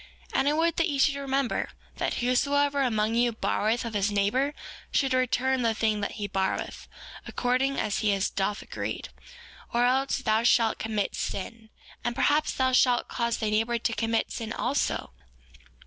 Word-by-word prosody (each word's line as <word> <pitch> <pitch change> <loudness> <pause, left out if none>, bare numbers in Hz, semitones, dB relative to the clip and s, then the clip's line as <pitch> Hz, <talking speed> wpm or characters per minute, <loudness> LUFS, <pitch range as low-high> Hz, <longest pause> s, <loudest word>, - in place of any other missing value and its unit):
4:28 - - +2
And 280 - +3
I - - +2
would 330 +1 +2
that 335 +1 +2
ye 285 - -1
should 275 +1 +4
remember, 275 -2 -1 0.3
that - - -1
whosoever 280 +3 +2
among 220 -4 +1
you 240 0 +2
borroweth 225 +1 0
of 230 - -5
his 205 0 +1
neighbor 250 +9 +1 0.4
should 270 -2 +2
return 255 +1 +1
the 230 -2 +1
thing 215 -1 +1
that 200 - -2
he 205 -2 -4
borroweth, 190 -1 -2 0.4
according 255 +2 0
as 210 - -1
he 205 -2 +1 0.2
doth 200 +1 -1
agree, - - -4 0.7
or 240 +1 +2
else 265 +2 +2
thou 220 -4 +1
shalt 230 -1 +3
commit 215 -2 -1
sin; 220 +3 -5 0.3
and 240 - -1
perhaps 300 +3 +2
thou 260 0 +1
shalt 250 -1 +3
cause 235 -1 -1
thy 215 -2 -1
neighbor 225 +3 +1
to 230 0 -1
commit 225 0 0
sin 225 -2 -5
also. 250 - -1
240 Hz, 170 wpm, -27 LUFS, 220-270 Hz, 0.7 s, should